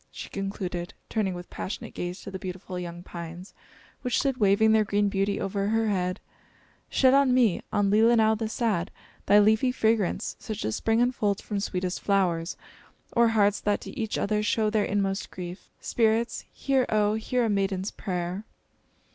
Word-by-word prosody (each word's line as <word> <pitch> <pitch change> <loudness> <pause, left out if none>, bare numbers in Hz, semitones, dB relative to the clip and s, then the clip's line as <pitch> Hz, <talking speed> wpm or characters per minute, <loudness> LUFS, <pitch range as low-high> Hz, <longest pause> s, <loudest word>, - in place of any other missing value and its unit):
she - - -8
concluded, 190 -3 -4
turning 200 -5 -1
with 175 0 -8
passionate 225 +4 -5
gaze 175 +1 -4
to - - -8
the 190 - -5
beautiful 185 0 -6
young 175 0 -7
pines 175 +2 -8 0.5
which 250 -2 0
stood 270 -3 +1
waving 210 +1 +4
their 220 -1 +5
green 205 0 +1
beauty 195 +1 0
over 195 0 -1
her 225 +1 +1
head, 185 -1 -1 0.7
"shed 260 -1 +4
on 275 -1 +5
me, 235 -8 +3
on 205 -1 +2
Leelinau 220 +1 +5
the 220 0 -2
sad, 215 -7 0 0.4
thy 205 - +6
leafy 220 +4 +4
fragrance, 220 -4 0
such 215 - -5
as 110 - -1
spring 225 +1 +1
unfolds 210 -5 0
from 205 -2 -3
sweetest 185 -2 -2
flowers, 180 -4 +1 0.6
or 235 0 +5
hearts 210 -2 +2
that 205 -1 +1
to - - -8
each 225 -6 -3
other 210 0 0
show 215 0 +1
their 215 -2 +2
inmost 195 -1 -1
grief. 180 0 -8
Spirits! 230 0 0
hear, 270 -2 +1
oh, 210 -1 +2
hear 235 +3 0
a - - +1
maiden's 195 -1 0
prayer!" 180 +1 -4
205 Hz, 170 wpm, -27 LUFS, 185-220 Hz, 0.7 s, thy